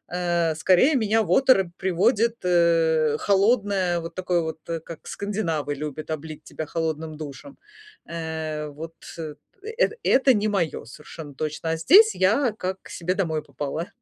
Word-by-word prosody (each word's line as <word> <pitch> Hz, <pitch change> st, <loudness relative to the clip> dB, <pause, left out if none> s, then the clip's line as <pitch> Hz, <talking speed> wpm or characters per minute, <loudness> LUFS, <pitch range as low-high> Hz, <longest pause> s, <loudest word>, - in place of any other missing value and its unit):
э, 170 Hz, -3 st, 0 dB
скорее 185 Hz, -, +4 dB
меня 220 Hz, -2 st, +2 dB
в 175 Hz, -, -4 dB
оторопь 255 Hz, -6 st, +5 dB
приводит, 215 Hz, +6 st, +2 dB
э, 165 Hz, -3 st, +3 dB
холодное, 200 Hz, -3 st, +2 dB
вот 165 Hz, 0 st, -8 dB
такое 180 Hz, -1 st, 0 dB
вот, 160 Hz, -1 st, -5 dB
э, 165 Hz, -1 st, -2 dB
как 165 Hz, 0 st, -10 dB
скандинавы 165 Hz, -8 st, -3 dB
любят 150 Hz, +1 st, -6 dB
облить 155 Hz, 0 st, -6 dB
тебя 155 Hz, -, -6 dB
холодным 160 Hz, 0 st, -3 dB
душем. 155 Hz, -, -9 dB, 0.6 s
Э, 160 Hz, -2 st, -4 dB
вот 160 Hz, +3 st, -9 dB, 0.9 s
эт -, -, +3 dB
это 265 Hz, 0 st, +4 dB
не 210 Hz, -1 st, +1 dB
моё, 175 Hz, -, -1 dB
совершенно 145 Hz, +4 st, -11 dB
точно. 155 Hz, +3 st, -4 dB
А 165 Hz, -, -1 dB
здесь 400 Hz, -, +6 dB
я 220 Hz, +6 st, +2 dB
как 185 Hz, -1 st, -3 dB
к -, -, -15 dB
себе 180 Hz, +1 st, -2 dB
домой 160 Hz, -6 st, -1 dB
попала. 150 Hz, +4 st, -5 dB
170 Hz, 150 wpm, -24 LUFS, 155-200 Hz, 0.9 s, здесь